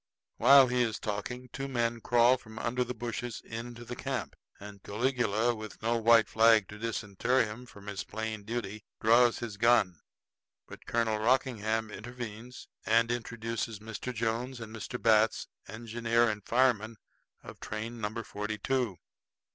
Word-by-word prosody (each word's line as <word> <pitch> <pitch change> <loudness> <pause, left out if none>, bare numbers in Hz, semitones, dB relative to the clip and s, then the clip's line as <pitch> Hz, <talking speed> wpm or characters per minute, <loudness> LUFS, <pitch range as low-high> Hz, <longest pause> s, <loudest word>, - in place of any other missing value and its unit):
While 135 +3 +8
he 125 0 +1
is 115 -3 0
talking, 120 +4 -5
two 135 +1 -4
men 120 -3 -1
crawl 120 +2 +5
from 110 -3 -13
under 125 +3 0
the 125 0 -5
bushes 120 0 -4
into 120 +1 -7
camp, 135 -3 -4 0.2
and 100 -1 -10
Caligula, 120 0 0
with 110 -2 -9
no 115 +1 +2
white 115 0 +5
flag 110 -3 +5
to 105 - -10
disinter 115 +2 0
him 110 +4 -8
from 100 -4 -14
his 100 -2 -4
plain 110 0 -4
duty, 110 -2 -4 0.2
draws 120 +2 +5
his 115 -4 -6
gun. 115 -6 +3 0.7
But - - -11
again - - -23 0.2
Colonel 110 -1 -1
Rockingham 110 -2 +1
intervenes 120 +1 -8 0.2
and 115 +1 +3
introduces 115 -1 -3
Mr. 110 +4 -6
Jones 120 +2 -2
and 110 -1 -8
Mr. 110 +3 -5
Batts, 110 -1 +3 0.2
engineer 115 +1 0
and 105 -2 -4
fireman 115 -2 +2 0.5
of - - -11
train 115 +2 -5
number 110 +2 -3
forty 105 +1 -4
two. 120 -3 -1
115 Hz, 150 wpm, -30 LUFS, 110-120 Hz, 0.7 s, While